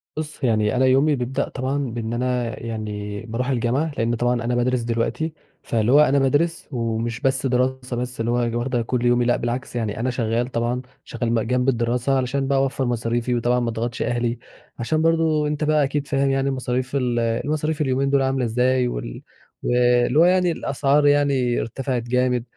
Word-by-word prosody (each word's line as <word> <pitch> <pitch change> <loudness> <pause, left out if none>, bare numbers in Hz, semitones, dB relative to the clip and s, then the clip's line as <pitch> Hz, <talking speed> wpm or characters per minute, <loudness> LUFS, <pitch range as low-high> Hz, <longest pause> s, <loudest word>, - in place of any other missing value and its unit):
بُصّ، 155 -2 -6
يعني 110 -2 +2
أنا 130 +1 +3
يومي 135 +4 +4
بيبدأ 135 +2 -2
طبعًا 130 +2 -2
بإن 115 0 -4
أنا 125 -1 -1
يعني 105 -2 -5
بارُوح 120 +3 -3
الجامعة، 130 +5 0
لأن 115 +1 +1
طبعًا 120 0 0
أنا 120 +1 0
بادرس 120 0 +1
دلوقتي، 120 +7 -2 0.3
فاللي 115 0 0
هو 145 - +7
أنا 140 -2 +4
بادرس 145 +5 +1
ومش 115 -1 -2
بس 135 -1 0
دراسة 130 0 0
بس 125 0 -4
اللي 115 +1 0
هو 120 -1 0
واخدة 120 -1 -1
كُلّ 120 +1 -1
يومي، 120 0 +3
لأ 120 0 +2
بالعكس، 120 +2 -4
يعني 110 -3 -2
أنا 125 +3 0
شغال 120 -1 -1
طبعًا 120 0 -1 0.2
شغال 120 -1 -3
بقى 115 -1 +1
جنب 125 +2 +1
الدراسة 125 +2 +1
علشان 135 +1 -1
بقى 135 0 +2
أوفّر 135 0 0
مصاريفي 120 0 -1
وطبعًا 120 +1 +1
ما 120 - -1
أضغطش 115 +1 -3
أهلي، 120 -1 -1 0.4
عشان 155 +7 0
برضه 160 -2 +2
أنت 150 +1 -2
بقى 150 -1 +3
أكيد 140 +1 -2
فاهم 140 -1 +1
يعني 135 0 +1
مصاريف 130 0 -2
ال 125 -3 0
المصاريف 150 +7 -1
اليومين 135 0 +1
دول 140 -1 +3
عاملة 130 -1 0
إزاي، 125 +2 +2
وال - - -5 0.4
واللي 125 +2 +3
هو 170 - +7
يعني 180 -1 +3
الأسعار 145 -1 +1
يعني 140 -4 +2
ارتفعِت 125 +1 -3
جامد، 125 0 +1
125 Hz, 185 wpm, -22 LUFS, 120-135 Hz, 0.4 s, هو